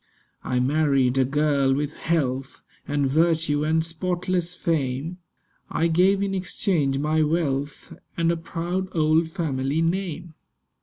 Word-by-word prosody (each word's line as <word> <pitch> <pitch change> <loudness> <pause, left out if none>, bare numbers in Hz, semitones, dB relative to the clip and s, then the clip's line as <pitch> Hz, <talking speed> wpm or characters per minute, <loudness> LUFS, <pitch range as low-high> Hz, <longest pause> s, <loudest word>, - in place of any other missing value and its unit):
I 125 - 0
married 135 -1 +2
a 130 - +4
girl 140 -1 +2
with 145 +1 -2
health 135 -5 -2 0.3
And 145 -1 0
virtue 155 0 +2
and 160 +1 +1
spotless 175 +1 -2
fame. 155 0 -2 0.5
I 165 - 0
gave 190 +4 +3
in 195 -1 -1
exchange 175 -6 0
my 155 +2 +1
wealth 150 -3 -1 0.2
And 165 0 +2
a - - 0
proud 175 +3 -3
old 160 +1 +3
family 155 -3 -1
name. 175 -1 -2
155 Hz, 125 wpm, -24 LUFS, 140-170 Hz, 0.5 s, a